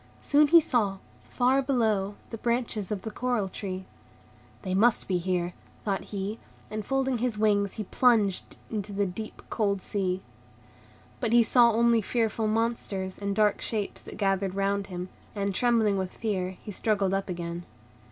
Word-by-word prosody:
Soon 295 Hz, +1 st, +5 dB
he 335 Hz, +3 st, +8 dB
saw, 220 Hz, -10 st, +1 dB, 0.3 s
far 260 Hz, +2 st, +3 dB
below, 220 Hz, -7 st, +1 dB, 0.2 s
the 225 Hz, -, -4 dB
branches 235 Hz, -4 st, -1 dB
of 200 Hz, -2 st, -3 dB
the 220 Hz, -, -4 dB
coral 240 Hz, -3 st, 0 dB
tree. 185 Hz, 0 st, -5 dB, 0.8 s
"They 185 Hz, -2 st, -2 dB
must 225 Hz, +5 st, +3 dB
be 185 Hz, -2 st, +1 dB
here," 175 Hz, 0 st, -1 dB, 0.3 s
thought 195 Hz, -2 st, -1 dB
he, 205 Hz, +2 st, -4 dB, 0.3 s
and, 215 Hz, 0 st, -3 dB
folding 265 Hz, 0 st, 0 dB
his 240 Hz, -2 st, -1 dB
wings, 205 Hz, -2 st, +2 dB
he 215 Hz, -, -4 dB
plunged 210 Hz, -3 st, +2 dB
into 205 Hz, -2 st, -3 dB
the 200 Hz, 0 st, +1 dB
deep, 215 Hz, +4 st, -6 dB
cold 200 Hz, -3 st, +1 dB
sea. 190 Hz, -1 st, -2 dB, 1.0 s
But 235 Hz, -2 st, 0 dB
he 240 Hz, -1 st, +7 dB
saw 235 Hz, +1 st, +5 dB
only 230 Hz, 0 st, +4 dB
fearful 225 Hz, 0 st, 0 dB
monsters 215 Hz, -4 st, -1 dB
and 200 Hz, -1 st, -2 dB
dark 210 Hz, -1 st, +3 dB
shapes 210 Hz, -3 st, -3 dB
that -, -, -10 dB
gathered 195 Hz, -2 st, 0 dB
round 200 Hz, 0 st, 0 dB
him; 180 Hz, -1 st, -5 dB, 0.3 s
and, 200 Hz, -1 st, -1 dB
trembling 220 Hz, -3 st, +2 dB
with 185 Hz, -1 st, -4 dB
fear, 190 Hz, -4 st, -2 dB
he 210 Hz, -, -6 dB
struggled 200 Hz, -1 st, +1 dB
up 195 Hz, 0 st, -1 dB
again. 170 Hz, -1 st, -4 dB
205 Hz, 160 wpm, -28 LUFS, 195-230 Hz, 1.0 s, he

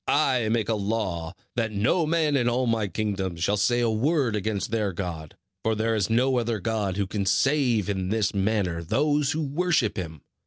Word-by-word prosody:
I 130 Hz, -6 st, +2 dB
make 110 Hz, -2 st, 0 dB
a 115 Hz, -, +1 dB
law 100 Hz, -5 st, -2 dB, 0.2 s
that 115 Hz, -2 st, 0 dB
no 110 Hz, -, +1 dB
man 155 Hz, -2 st, +2 dB
in 120 Hz, -3 st, +2 dB
all 125 Hz, +2 st, 0 dB
my 115 Hz, -3 st, +1 dB
kingdoms 95 Hz, -3 st, -3 dB
shall 100 Hz, -, +2 dB
say 110 Hz, +4 st, +2 dB
a 120 Hz, -, +2 dB
word 130 Hz, +1 st, +1 dB
against 105 Hz, 0 st, -2 dB
their 105 Hz, -4 st, 0 dB
God, 85 Hz, -4 st, -5 dB, 0.3 s
for 110 Hz, 0 st, +1 dB
there 110 Hz, +1 st, 0 dB
is 105 Hz, -2 st, 0 dB
no 125 Hz, +3 st, +2 dB
other 115 Hz, -2 st, -1 dB
god 100 Hz, -1 st, -2 dB
who 100 Hz, -, +1 dB
can 100 Hz, +1 st, -2 dB
save 120 Hz, 0 st, +2 dB
in 95 Hz, -2 st, -2 dB
this 105 Hz, -1 st, 0 dB
manner 95 Hz, -4 st, 0 dB
those 145 Hz, -, +1 dB
who 160 Hz, 0 st, -1 dB
worship 145 Hz, -, 0 dB
him. 80 Hz, -5 st, -5 dB
110 Hz, 195 wpm, -25 LUFS, 100-125 Hz, 0.3 s, I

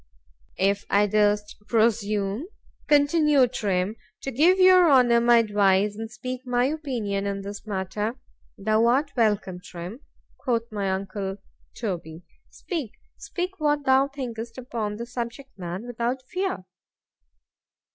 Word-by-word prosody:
_ -, -, -35 dB, 0.5 s
If 200 Hz, +1 st, +1 dB
I 205 Hz, +1 st, +4 dB
durst 210 Hz, 0 st, +1 dB
presume, 215 Hz, -, +1 dB, 0.4 s
continued 290 Hz, -3 st, +4 dB
Trim, 195 Hz, 0 st, -1 dB, 0.3 s
to 270 Hz, -, -3 dB
give 325 Hz, +9 st, +4 dB
your 370 Hz, -2 st, +7 dB
Honour 240 Hz, -3 st, +5 dB
my 240 Hz, 0 st, +6 dB
advice, 205 Hz, -2 st, +3 dB
and 225 Hz, +1 st, -6 dB
speak 255 Hz, +3 st, -6 dB
my 245 Hz, -1 st, +1 dB
opinion 245 Hz, -10 st, -2 dB
in 200 Hz, 0 st, -3 dB
this 200 Hz, +2 st, -8 dB
matter.—Thou 215 Hz, +2 st, -2 dB
art 275 Hz, +5 st, +2 dB
welcome, 210 Hz, -6 st, +1 dB
Trim, 180 Hz, +7 st, -8 dB, 0.4 s
quoth 235 Hz, -3 st, -1 dB
my 200 Hz, -2 st, -2 dB
uncle 195 Hz, 0 st, -3 dB, 0.4 s
Toby—speak,——speak 225 Hz, -, -6 dB
what 295 Hz, -2 st, +1 dB
thou 265 Hz, +1 st, +4 dB
thinkest 240 Hz, -4 st, -6 dB
upon 230 Hz, -5 st, -4 dB
the 235 Hz, +2 st, -5 dB
subject, 245 Hz, +3 st, -6 dB
man, 180 Hz, +4 st, -5 dB
without 245 Hz, +2 st, -2 dB
fear. 365 Hz, -, -3 dB
230 Hz, 120 wpm, -25 LUFS, 200-265 Hz, 0.5 s, your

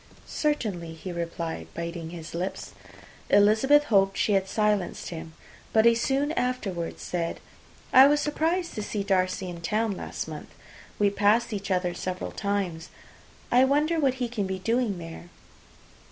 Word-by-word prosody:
"Certainly," 200 Hz, -, -2 dB
he 180 Hz, +3 st, -7 dB
replied, 170 Hz, -1 st, -4 dB
biting 170 Hz, -1 st, -5 dB
his 165 Hz, -2 st, -8 dB
lips. 180 Hz, +3 st, -4 dB, 0.6 s
Elizabeth 220 Hz, +9 st, +5 dB
hoped 195 Hz, -7 st, +2 dB
she -, -, +1 dB
had 190 Hz, -1 st, +2 dB
silenced 210 Hz, -3 st, 0 dB
him; 160 Hz, -1 st, -7 dB, 0.4 s
but 220 Hz, 0 st, +5 dB
he 235 Hz, -, +7 dB
soon 270 Hz, +5 st, 0 dB
afterwards 225 Hz, -, -2 dB
said, 170 Hz, -2 st, -3 dB, 0.5 s
"I 265 Hz, +1 st, +9 dB
was 295 Hz, +1 st, +3 dB
surprised 325 Hz, +4 st, 0 dB
to 215 Hz, -, -4 dB
see 205 Hz, 0 st, -3 dB
Darcy 185 Hz, -1 st, 0 dB
in 175 Hz, -1 st, -7 dB
town 215 Hz, +5 st, 0 dB
last -, -, -5 dB
month. -, -, -8 dB, 0.5 s
We 205 Hz, -1 st, +3 dB
passed 215 Hz, +3 st, +2 dB
each 200 Hz, -1 st, -4 dB
other 180 Hz, -2 st, 0 dB
several 185 Hz, +1 st, -4 dB
times. 195 Hz, -5 st, -2 dB, 0.6 s
I 250 Hz, +2 st, +6 dB
wonder 300 Hz, +5 st, +2 dB
what 270 Hz, -4 st, +2 dB
he 250 Hz, -2 st, -2 dB
can 220 Hz, -5 st, -2 dB
be 190 Hz, 0 st, -3 dB
doing 225 Hz, 0 st, 0 dB
there." 165 Hz, 0 st, -9 dB
200 Hz, 155 wpm, -27 LUFS, 175-245 Hz, 0.6 s, I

